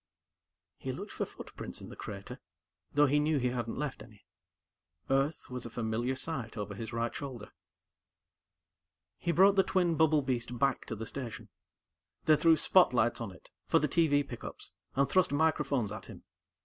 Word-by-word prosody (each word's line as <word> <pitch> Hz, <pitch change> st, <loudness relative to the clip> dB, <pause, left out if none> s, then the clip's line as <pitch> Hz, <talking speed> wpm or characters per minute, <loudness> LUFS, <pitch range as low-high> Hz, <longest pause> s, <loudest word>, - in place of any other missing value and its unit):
He -, -, -3 dB
looked -, -, -7 dB
for -, -, -2 dB
footprints -, -, -8 dB
in -, -, -9 dB
the -, -, -9 dB
crater, 100 Hz, -1 st, -7 dB, 0.5 s
though 145 Hz, +1 st, +5 dB
he 145 Hz, +1 st, +3 dB
knew 150 Hz, +1 st, +2 dB
he 125 Hz, -2 st, +1 dB
hadn't 120 Hz, -2 st, -3 dB
left 150 Hz, -2 st, -3 dB
any. 105 Hz, -2 st, -15 dB, 0.9 s
Earth 135 Hz, +3 st, +1 dB
was 125 Hz, -1 st, -4 dB
a 115 Hz, -, -6 dB
familiar 120 Hz, +2 st, -1 dB
sight 130 Hz, -5 st, -4 dB
over 105 Hz, 0 st, -4 dB
his 110 Hz, +2 st, -6 dB
right 115 Hz, 0 st, -1 dB
shoulder. 130 Hz, -7 st, -7 dB, 1.7 s
He 170 Hz, -, 0 dB
brought 195 Hz, +3 st, +5 dB
the -, -, +8 dB
twin 180 Hz, -3 st, +2 dB
bubble 155 Hz, -2 st, +4 dB
beast 120 Hz, -2 st, -2 dB
back 135 Hz, 0 st, +1 dB
to 110 Hz, -, -3 dB
the 110 Hz, +1 st, -5 dB
station. 120 Hz, -2 st, -6 dB, 0.8 s
They 155 Hz, -, +7 dB
threw 160 Hz, +1 st, +5 dB
spotlights 125 Hz, -13 st, +4 dB
on 110 Hz, -4 st, -4 dB
it, 90 Hz, -, -17 dB, 0.2 s
for -, -, +4 dB
the 150 Hz, -, +2 dB
TV 145 Hz, -2 st, +3 dB
pickups, 120 Hz, -, -8 dB, 0.2 s
and 140 Hz, +1 st, +3 dB
thrust 185 Hz, -5 st, +3 dB
microphones 145 Hz, -7 st, +1 dB
at 110 Hz, -, -7 dB
him. -, -, -11 dB
135 Hz, 170 wpm, -32 LUFS, 115-150 Hz, 1.7 s, the